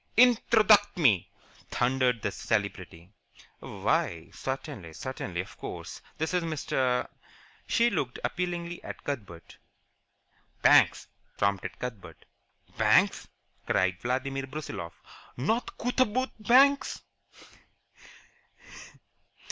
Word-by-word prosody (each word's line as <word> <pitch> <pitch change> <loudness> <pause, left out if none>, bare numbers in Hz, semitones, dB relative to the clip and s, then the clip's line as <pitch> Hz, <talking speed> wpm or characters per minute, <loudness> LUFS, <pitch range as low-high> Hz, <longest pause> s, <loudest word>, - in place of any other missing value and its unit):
"Introduct 220 -4 +5
me!" 115 - +3 0.4
thundered 125 -2 +1
the - - 0
Celebrity. 95 -5 -3 0.5
"Why, 85 -1 -2
certainly, 130 - -6
certainly, 90 -3 -4
of 90 - -12
course. - - -7 0.2
This 160 +3 -2
is 180 - +2
Mr. 130 -6 0 0.3
." - - -28
She 235 +1 +3
looked 125 - -2
appealingly 175 -1 -3
at - - -8
Cuthbert. 100 - -6 1.1
"Banks," - - +5 0.3
prompted 100 -2 -1
Cuthbert. 100 -10 -8 0.5
"Banks!" - - +3 0.4
cried 95 0 +1
Vladimir 135 +2 -2
Brusiloff. 135 - -6 0.4
"Not 220 - -1
Cootaboot 255 +1 0
Banks?" 270 +6 +4
135 Hz, 90 wpm, -28 LUFS, -, 1.1 s, Introduct